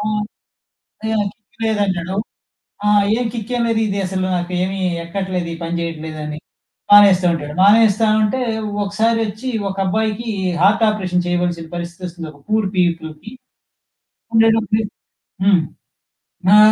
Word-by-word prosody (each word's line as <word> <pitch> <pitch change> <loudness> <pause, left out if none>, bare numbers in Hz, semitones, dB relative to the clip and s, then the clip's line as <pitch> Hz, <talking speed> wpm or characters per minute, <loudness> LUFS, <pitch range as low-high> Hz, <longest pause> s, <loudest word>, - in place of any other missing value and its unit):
ఆ! - - -3 1.1
ఎహ్! 220 - 0
నాకు 200 -1 -1
కిక్ 225 +2 -22
లేదంటాడు. 190 -4 -1 0.7
ఆ! - - +2 0.3
ఏం 245 - -1
కిక్కేం 240 +1 -3
లేదిదసలు, 195 -4 -1
నాకేమి 180 +2 -2 0.2
ఎక్కట్లేదు, 180 0 -3
ఈ - - -5
పని 170 +1 -2
చేయట్లేదని 155 -2 -5 0.5
మానేస్తా 200 -3 +7
ఉంటాడు. 150 -2 -5
మానేస్తా 215 +2 +5
ఉంటే, 215 +5 +1 0.4
ఒకసారి 225 +3 +1
వచ్చి 215 +5 -5 0.2
ఒక 195 - -6
అబ్బాయికి 220 +3 -1 0.3
హార్ట్ 205 +4 +4
ఆపరేషన్ 180 -4 -1
చేయవలసిన 175 -2 -1
పరిస్థితొస్తుంది. 175 -1 -6
ఒక 145 - -19
పూర్ 215 -2 +2
పీపుల్‌కి. 170 +2 -1 1.0
ఉండేటప్పటికి 225 -1 +3 0.5
హ్మ్. 190 -3 +5 0.9
ఆ! - - +8
195 Hz, 115 wpm, -19 LUFS, 175-215 Hz, 1.1 s, ఆ